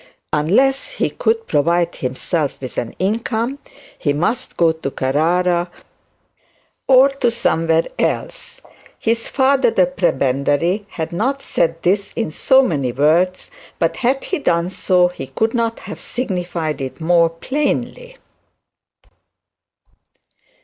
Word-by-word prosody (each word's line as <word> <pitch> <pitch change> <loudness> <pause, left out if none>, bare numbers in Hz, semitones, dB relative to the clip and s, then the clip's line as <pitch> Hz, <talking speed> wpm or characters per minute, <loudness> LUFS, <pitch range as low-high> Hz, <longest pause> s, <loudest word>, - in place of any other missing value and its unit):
Unless 240 - +2
he - - -1
could 455 0 0
provide 170 - +1
himself 140 +4 -2
with 130 -2 -5
an 115 - -6
income, 230 +6 -1 0.4
he 145 - 0
must 220 - -2
go 165 -1 +4
to 160 -3 -5
Carrara 170 +7 +1 1.2
or 265 +1 +7
to. 275 -3 -1 1.7
His 230 0 -1
father 265 -2 +3
the 185 -5 +3
prebendary 165 +3 0
had 165 -3 -5
not 265 +10 -1
said 165 -9 -1
this 195 +3 +1
in 225 -9 -2
so 265 - +4
many 140 - -1
words, 165 +8 +1 0.3
but - - 0
had 260 +2 0
he 375 - -2
done 175 -7 0
so, 180 -1 +3
he 155 -7 -8
could 225 - -1
not 230 -2 -1
have - - -8
signified 175 - -3
it 130 +3 -6
more 170 0 +3
plainly. 295 - -3
180 Hz, 115 wpm, -19 LUFS, 160-245 Hz, 1.7 s, or